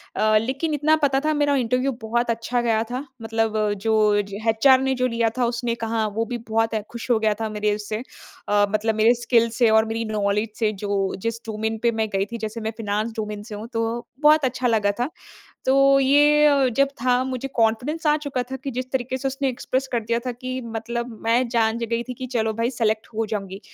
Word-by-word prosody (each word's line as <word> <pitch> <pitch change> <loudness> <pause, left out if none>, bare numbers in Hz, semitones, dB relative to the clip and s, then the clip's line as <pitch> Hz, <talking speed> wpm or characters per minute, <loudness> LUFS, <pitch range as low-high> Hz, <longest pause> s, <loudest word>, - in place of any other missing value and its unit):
अ, 215 0 +3
लेकिन 275 +6 -2
इतना 305 +2 +3
पता 270 -1 +3
था 310 - +2
मेरा 290 -1 +2
इंटरव्यू 255 +2 +1
बहुत 235 +2 -1
अच्छा 235 +2 -1
गया 225 -1 +1
था। 260 +4 -3 0.2
मतलब 225 -1 -1 0.3
जो 215 -2 +3
ज 200 0 -10 0.2
एचआर 260 +4 +5
ने 265 0 +1
जो 255 0 +1
लिया 230 -1 +1
था 245 - +2
उसने 235 0 -1
कहा 225 -1 0
वो 225 0 0
भी 240 0 -4
बहुत 225 +1 +1 0.2
खुश 235 +1 -7
हो 230 - +5
गया 215 -1 +2
था 220 - -1
मेरे 210 0 0
उससे 215 0 -4 0.5
अ, 205 0 +4
मतलब 215 +1 0
मेरे 220 +2 +5
स्किल्स 235 -1 +1
से 235 -3 +4
और 220 0 +4
मेरी 225 +1 -3
नॉलेज 210 0 0
से 215 -2 +2
जो 200 - -2 0.4
जिस 230 0 -1
डोमेन 220 +1 -2
पे 235 - +4
मैं 220 -1 -1
गई 195 0 +1
थी, 235 +3 -7
जैसे 220 +1 -5
मैं 220 +1 -2
फाइनेंस 215 +1 -1
डोमेन 210 -1 -4
से 215 -2 -8
हूँ, 215 +3 -7
तो 230 +1 -2 0.2
बहुत 300 -1 +5
अच्छा 250 0 0
लगा 210 -3 +2
था। 250 +5 0 0.6
तो 275 +1 +5
ये 295 +2 +5
अ, 280 -3 +4
जब 275 +3 +2
था 250 0 +3
मुझे 260 0 -4
कॉन्फिडेंस 245 +8 0
आ 300 0 +4
चुका 285 -4 -3
था 265 - -3
कि 275 +1 -6
जिस 255 +1 -5
तरीके 260 0 -1
से 270 +1 -1
उसने 270 0 -1
एक्सप्रेस 260 +1 -2
कर 235 - +1
दिया 235 +1 0
था 250 - -1
कि 255 +2 -5 0.2
मतलब 235 0 -4
मैं 235 +2 +3
जान 230 -1 +1
ज 235 - -2
गई 230 0 0
थी 250 - -4
कि 255 +1 -6
चलो 220 0 0
भई 230 +2 0
सेलेक्ट 220 -2 -1
हो 225 0 -1
जाऊँगी। 195 -2 -5
230 Hz, 225 wpm, -23 LUFS, 220-255 Hz, 0.6 s, एचआर